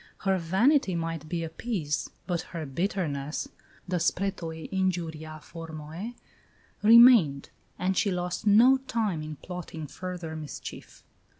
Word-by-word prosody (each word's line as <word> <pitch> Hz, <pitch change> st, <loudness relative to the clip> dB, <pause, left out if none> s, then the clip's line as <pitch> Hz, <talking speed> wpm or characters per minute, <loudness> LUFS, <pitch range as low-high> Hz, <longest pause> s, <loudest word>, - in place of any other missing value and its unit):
Her 190 Hz, -2 st, +2 dB
vanity 190 Hz, -, +3 dB
might 165 Hz, -2 st, -3 dB
be 170 Hz, 0 st, -2 dB
appeased, 165 Hz, -2 st, -3 dB
but 175 Hz, -3 st, -1 dB, 0.2 s
her 160 Hz, -, -3 dB
bitterness 150 Hz, -2 st, -2 dB, 0.4 s
the 180 Hz, 0 st, 0 dB
spretoe 165 Hz, -2 st, -2 dB
injuria 165 Hz, -5 st, -2 dB
formoe 165 Hz, +6 st, -7 dB, 0.7 s
remained; 220 Hz, -, +7 dB, 0.3 s
and 190 Hz, +1 st, 0 dB
she 200 Hz, -, +2 dB
lost 180 Hz, +3 st, -2 dB
no 235 Hz, +6 st, +7 dB
time 225 Hz, -10 st, -2 dB
in 155 Hz, 0 st, -6 dB
plotting 170 Hz, -1 st, -7 dB
further 175 Hz, +1 st, -6 dB
mischief. 155 Hz, -2 st, -8 dB
175 Hz, 115 wpm, -28 LUFS, 160-195 Hz, 0.7 s, remained